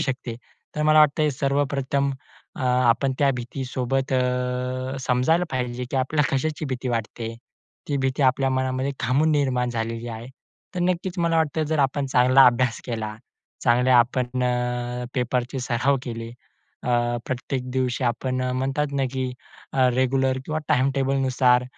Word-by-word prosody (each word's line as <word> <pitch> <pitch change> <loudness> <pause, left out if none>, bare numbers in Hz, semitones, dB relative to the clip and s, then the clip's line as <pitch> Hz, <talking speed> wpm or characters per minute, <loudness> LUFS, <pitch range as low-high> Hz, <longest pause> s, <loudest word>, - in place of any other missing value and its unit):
शकते. 130 -3 -3 0.4
तर 150 - -1
मला 155 0 +5
वाटतं 150 0 +5
हे 150 - +3
सर्वप्रथम 140 0 0 0.5
अ, - - -7
आपण 125 +1 +3
त्या 140 -2 +4
भीतीसोबत 130 +2 -2
अ, 125 +1 -1
समजायला 130 +7 +2
पाहिजे 125 -1 -2
की 135 - -2
आपल्याला 135 +1 +1
कशाची 155 +3 -1
भीती 130 -1 -3
वाटते? 115 0 -3 0.5
ती 145 - 0
भीती 135 +1 0
आपल्या 135 +1 +3
मनामध्ये 130 +1 -1
का 125 - -1
म्हणून 155 +4 +3
निर्माण 130 -4 +1
झालेली 115 0 -3
आहे? 115 +1 -7 0.5
तर 180 - -2
नक्कीचं 180 0 -1
मला 165 -1 +2
वाटतं, 160 0 +1
जर 155 -1 0
आपण 140 0 +1
चांगला 130 0 +5
अभ्यास 125 -1 +2
केला. 110 -3 -4 0.5
चांगले 125 +1 +3
आपण 125 +1 +2
अ, 125 0 -1
पेपरचे 125 0 -1
सराव 125 +3 +1
केले. 115 -2 -5 0.5
अ, - - -2 0.4
प्रत्येक 130 0 -3
दिवशी 130 0 -1
आपण 130 +2 -1
अ, 125 0 -1
म्हणतात 135 +3 -1
ना - - +2
की 130 -1 -2 0.4
अ, 130 -1 +4
रेग्युलर 130 0 +1
किंवा 155 0 -2
टाइम-टेबलनुसार 135 -3 +2
130 Hz, 150 wpm, -24 LUFS, 125-140 Hz, 0.5 s, मला